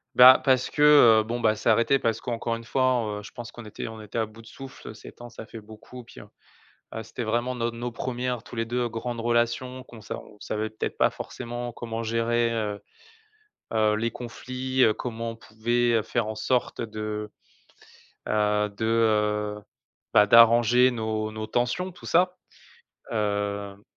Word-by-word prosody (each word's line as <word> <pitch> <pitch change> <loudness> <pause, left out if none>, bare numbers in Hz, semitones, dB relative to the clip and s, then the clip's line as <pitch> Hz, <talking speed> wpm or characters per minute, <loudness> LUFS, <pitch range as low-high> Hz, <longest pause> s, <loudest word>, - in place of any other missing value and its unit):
Ben, 130 +1 +10
parce 130 -2 +2
que, 150 - -3 0.4
heu, - - -3
bon 115 +3 -3
bah, 110 -2 +2
c'est 110 - -1
arrêté 115 +5 +4
parce 115 -4 -1
qu'encore 115 -1 -2
une 115 - -8
fois, 130 0 +1 0.2
heu, - - -11
je - - -11
pense 120 -1 -9
qu'on 120 - -11
était, 105 - -7
on 110 0 -8
était 105 +2 -5
à 110 - 0
bout 110 +1 -15
de - - -16
souffle, 135 -4 -10
7 110 - -13
ans 120 - -9
ça 115 -2 -10
fait 115 - -9
beaucoup, 110 +4 -12
puis, 115 - -14
heu - - -14 0.7
heu, 110 - -4
c'était 115 +2 -6
vraiment 120 +3 -1
nos 120 -1 -1
nos 120 +1 -5
premières, 125 0 -3
tous - - -12
les 115 -1 -2
2, 120 +1 -1
grandes 115 +1 -4
relations 120 +2 0
qu'on 115 -4 -13
sa - - -6
on 105 - -14
savait 110 0 -3
peut-être 110 - -5
pas - - +5
forcément 120 -1 -6
comment 115 -1 -5
gérer, 115 +1 +1
heu 105 -3 -3 0.9
heu, 110 -1 +3
les 115 +2 -1
conflits, 130 +2 -3
heu, 110 -3 +5
comment 115 -1 -5
on - - -12
pouvait 115 +1 0
faire 115 +1 -1
en 110 - -4
sorte 125 +3 -1
de, 105 -1 -5 1.0
heu 105 0 +1
de, 100 +2 -5
heu, 105 -2 +1 0.5
bah, 105 - +6
d'arranger 120 +3 +6
nos 110 -2 -2
nos 110 0 -6
tensions, 125 +12 -1
tout - - -14
ça, 180 +2 +2 0.7
hem 100 -2 -2
115 Hz, 185 wpm, -26 LUFS, 110-120 Hz, 1.0 s, Ben